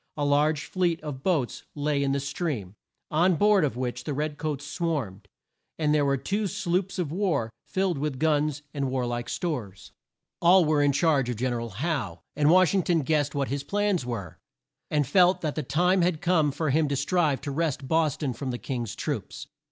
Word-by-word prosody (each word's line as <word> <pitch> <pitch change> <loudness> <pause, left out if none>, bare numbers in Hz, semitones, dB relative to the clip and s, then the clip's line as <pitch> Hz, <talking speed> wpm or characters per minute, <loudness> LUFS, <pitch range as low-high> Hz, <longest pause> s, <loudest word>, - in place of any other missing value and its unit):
A 145 - 0
large 150 +1 +2
fleet 175 -3 0
of 145 -4 -6
boats 150 -7 0
lay 145 -1 0
in 140 -1 +1
the 140 - +1
stream, 140 - -3 0.4
on 175 +4 +3
board 205 +1 +4
of 135 -5 -1
which 125 -1 -3
the 145 - -3
red 150 +1 -3
coats 145 -2 -3
swarmed, 140 - -3 0.5
and 150 -2 +1
there 150 -1 +3
were 140 0 +2
two 205 +9 -1
sloops 195 -1 -1
of 170 -6 -2
war 170 - 0 0.2
filled 185 -5 0
with 145 -2 -2
guns 150 -1 +1
and 140 -3 -1
war 130 -1 -1
like 120 0 -3
stores. 120 - -4 0.5
All 180 +1 +6
were 150 -1 +2
in 145 0 +4
charge 140 -3 +2
of 125 - -1
Gen 125 +3 -1
er 120 - -2
al 115 - -5
Howe, 110 - -3
and 145 +1 +3
Wash 185 -1 +5
ing 195 - +3
ton 170 -2 +1
guessed 145 0 0
what 140 -1 -1
his 140 0 -2
plans 205 0 0
were! 115 -9 -6 0.5
and 150 -1 +1
felt 180 +5 +4
that 155 -3 -1
the 155 - -2
time 175 +7 +2
had 175 -2 +1
come 160 -4 +2
for 150 +1 -1
him 155 +2 +2
to 140 - -1
strive 150 0 +1
to 140 - -4
wrest 145 -2 -1
Bos 160 -2 +2
ton 140 -5 -2
from 130 +3 -5
the 120 - -2
King's 120 -4 -4
troops. - - -4
150 Hz, 205 wpm, -26 LUFS, 135-170 Hz, 0.5 s, All